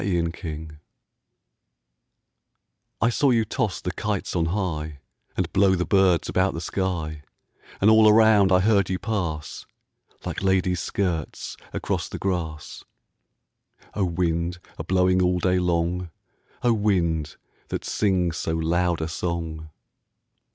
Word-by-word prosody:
The 90 Hz, -3 st, +1 dB
Wind 80 Hz, -2 st, -5 dB, 2.2 s
I 115 Hz, -, +4 dB
SAW 140 Hz, +4 st, +2 dB
you 115 Hz, -3 st, +3 dB
toss 110 Hz, -3 st, -2 dB
the 90 Hz, -, -2 dB
kites 105 Hz, -2 st, -3 dB
on 85 Hz, -2 st, +1 dB
highAnd 80 Hz, -6 st, -4 dB
blow 95 Hz, -1 st, +4 dB
the 90 Hz, 0 st, -1 dB
birds 95 Hz, -3 st, +3 dB
about 95 Hz, +1 st, +1 dB
the -, -, -3 dB
sky; 80 Hz, -4 st, -3 dB, 0.6 s
And 100 Hz, -, +3 dB
all 110 Hz, 0 st, +7 dB
around 105 Hz, -3 st, +5 dB
I 90 Hz, 0 st, +5 dB
heard 100 Hz, -2 st, +3 dB
you 95 Hz, -, 0 dB
pass, 90 Hz, -8 st, -4 dB, 0.6 s
Like -, -, -4 dB
ladies' 95 Hz, -2 st, +1 dB
skirts 80 Hz, 0 st, -3 dB, 0.2 s
across -, -, -2 dB
the -, -, -6 dB
grass—O 85 Hz, 0 st, -7 dB
wind, 85 Hz, 0 st, -1 dB, 0.2 s
a -, -, -3 dB
blowing 90 Hz, +1 st, +2 dB
all 90 Hz, 0 st, +2 dB
day 90 Hz, +1 st, +2 dB
long,O 90 Hz, +6 st, -2 dB
wind, 85 Hz, -8 st, 0 dB, 0.3 s
that -, -, -4 dB
sings 90 Hz, -5 st, 0 dB
so 80 Hz, -, -2 dB
loud 85 Hz, +1 st, 0 dB
a 80 Hz, -, -1 dB
song! 80 Hz, -2 st, -4 dB
90 Hz, 125 wpm, -24 LUFS, 80-95 Hz, 2.2 s, all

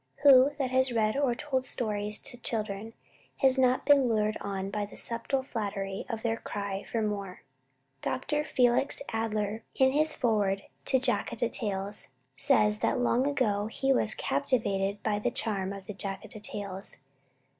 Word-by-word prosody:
Who 275 Hz, 0 st, +8 dB
that 265 Hz, -3 st, -1 dB
has 260 Hz, 0 st, +4 dB
read 215 Hz, -2 st, +1 dB
or 275 Hz, -4 st, +1 dB
told 260 Hz, -1 st, -1 dB
stories 210 Hz, -4 st, -2 dB
to 275 Hz, -, -1 dB
children 215 Hz, -1 st, -2 dB, 0.4 s
has 265 Hz, -1 st, +3 dB
not 255 Hz, 0 st, +3 dB
been 280 Hz, -4 st, +5 dB
lured 215 Hz, -1 st, +1 dB
on 195 Hz, -1 st, -3 dB
by 210 Hz, +1 st, -1 dB
the -, -, -13 dB
subtle 240 Hz, +3 st, -1 dB
flattery 200 Hz, -5 st, -4 dB
of 225 Hz, -2 st, -4 dB
their 225 Hz, -1 st, 0 dB
cry 200 Hz, -2 st, -4 dB
for 225 Hz, -2 st, -2 dB
"more"? 200 Hz, -3 st, -4 dB, 0.6 s
Dr. 295 Hz, +3 st, -1 dB
Felix 250 Hz, +1 st, +2 dB
Adler, 220 Hz, -1 st, -1 dB
in 265 Hz, 0 st, +4 dB
his 310 Hz, +3 st, +2 dB
Foreword 205 Hz, -5 st, +1 dB, 0.2 s
to 265 Hz, -, +4 dB
"Jataka 240 Hz, -2 st, 0 dB
Tales," 200 Hz, -2 st, -3 dB, 0.3 s
says 210 Hz, +7 st, +3 dB
that -, -, +1 dB
long 245 Hz, +2 st, +2 dB
ago 215 Hz, -8 st, +1 dB
he 270 Hz, +4 st, +1 dB
was 215 Hz, -4 st, +1 dB
"captivated 200 Hz, -, 0 dB
by 210 Hz, -1 st, 0 dB
the -, -, 0 dB
charm 195 Hz, -4 st, -2 dB
of 195 Hz, -1 st, -8 dB
the 210 Hz, -, -6 dB
Jataka 195 Hz, +2 st, -6 dB
Tales." 200 Hz, -2 st, -5 dB
220 Hz, 155 wpm, -29 LUFS, 205-255 Hz, 0.6 s, Who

